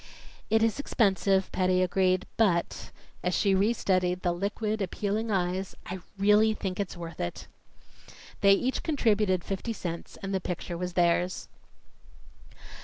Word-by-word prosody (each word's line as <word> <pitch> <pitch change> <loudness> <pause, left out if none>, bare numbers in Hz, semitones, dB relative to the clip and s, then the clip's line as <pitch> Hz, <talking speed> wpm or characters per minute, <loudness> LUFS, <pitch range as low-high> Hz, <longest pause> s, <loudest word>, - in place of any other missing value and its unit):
"It 220 +1 +3
is 225 +4 +1
expensive," 195 -7 +2
Patty 185 0 +2
agreed, 185 0 +1
"but 180 -7 +1 0.2
" - - -30
as 180 0 0
she 200 -2 +2
restudied 190 -3 +1
the 175 - +2
liquid, 210 +4 -2
appealing 205 +4 -2
eyes 185 -1 -1
"I 185 +1 -5 0.2
really 210 +2 +4
think 190 -2 -4
it's 195 -3 -3
worth 170 -2 -8
it." 85 - -4 0.9
They 200 0 +6
each 250 +6 0
contributed 210 - +1
fifty 200 +4 -3
cents, 170 -5 -6
and 195 0 -3
the 190 - 0
picture 180 -1 -4
was 180 +1 -4
theirs. 175 +1 +1
190 Hz, 140 wpm, -28 LUFS, 180-210 Hz, 0.9 s, They